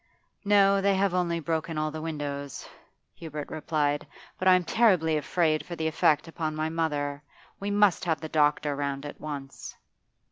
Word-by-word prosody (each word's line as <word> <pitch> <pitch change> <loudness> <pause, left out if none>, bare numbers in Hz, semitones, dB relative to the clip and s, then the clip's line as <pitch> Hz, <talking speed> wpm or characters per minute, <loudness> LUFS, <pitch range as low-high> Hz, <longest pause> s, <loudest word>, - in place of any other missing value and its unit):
'No, 200 -1 +4
they 200 0 +3
have 195 -1 +1
only 175 -2 0
broken 160 0 -2
all 155 0 -1
the 155 0 -6
windows,' 145 -4 -5 0.5
Hubert 150 -3 -7
replied. 150 -2 -1 0.3
'But 185 - 0
I 185 - +8
am 180 - +1
terribly 175 -5 +3
afraid 155 +1 +1
for 175 - -7
the 160 - -3
effect 155 0 +2
upon 160 -1 -3
my 155 +1 -1
mother. 145 -3 -2 0.4
We 200 - -3
must 205 -3 +3
have 160 -4 0
the 160 - -6
doctor 150 -1 +2
round 140 0 -3
at 145 - -8
once. 140 -3 -7
160 Hz, 170 wpm, -27 LUFS, 145-175 Hz, 0.5 s, I